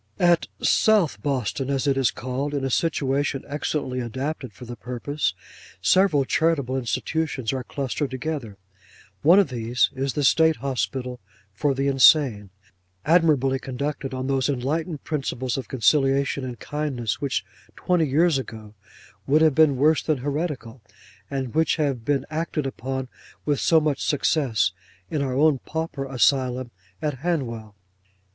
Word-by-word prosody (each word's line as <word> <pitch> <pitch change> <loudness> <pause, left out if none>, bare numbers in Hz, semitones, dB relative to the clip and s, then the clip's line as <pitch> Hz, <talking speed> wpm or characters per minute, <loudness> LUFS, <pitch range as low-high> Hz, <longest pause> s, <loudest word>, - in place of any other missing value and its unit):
At 175 -1 +3 0.2
SOUTH 210 -8 +3
BOSTON, 135 -1 -2
as 140 0 0
it 140 -1 +2
is 135 -4 +2
called, 130 +6 -3
in 135 -1 -1
a 135 - -2
situation 140 -2 0
excellently 145 -3 -2
adapted 130 +2 -4
for 115 +5 -12
the 120 0 -7
purpose, 125 -4 -3 0.4
several 155 - +3
charitable 145 -4 +1
institutions 135 0 -2
are 130 -1 -3
clustered 140 +1 -3
together. 130 -6 -4 0.6
One 170 +5 +6
of 200 -7 +4
these, 120 0 +1
is 135 0 -2
the 145 - -1
State 160 +3 +4
Hospital 125 -1 -3 0.3
for 140 +7 0
the 135 +1 0
insane; 135 -6 +5 0.6
admirably 150 -5 +3
conducted 135 +1 -4
on 130 0 -4
those 135 0 0
enlightened 145 +4 -2
principles 130 -4 -2
of 135 - -4
conciliation 135 +1 +2
and 125 -2 -5
kindness, 145 -7 -3
which 140 -2 -1 0.3
twenty 175 -4 +1
years 155 +1 +3
ago 110 -4 -9 0.5
would 155 +3 +4
have 155 -2 +5
been 145 -2 +4
worse 155 +4 +3
than 155 -2 0
heretical, 140 -3 -4 0.5
and 135 -4 -3
which 160 -1 +2
have 140 -7 -1
been 140 +1 0
acted 155 -2 -2
upon 130 0 -4 0.4
with 145 -2 +1
so 165 - +4
much 150 -3 -1
success 130 - +1 0.4
in 150 - 0
our 130 -2 -1
own 145 -1 +3
pauper 160 -1 -4
Asylum 130 -1 +1 0.3
at 145 -4 -2
Hanwell. 120 -10 -3
135 Hz, 145 wpm, -24 LUFS, 130-150 Hz, 0.6 s, One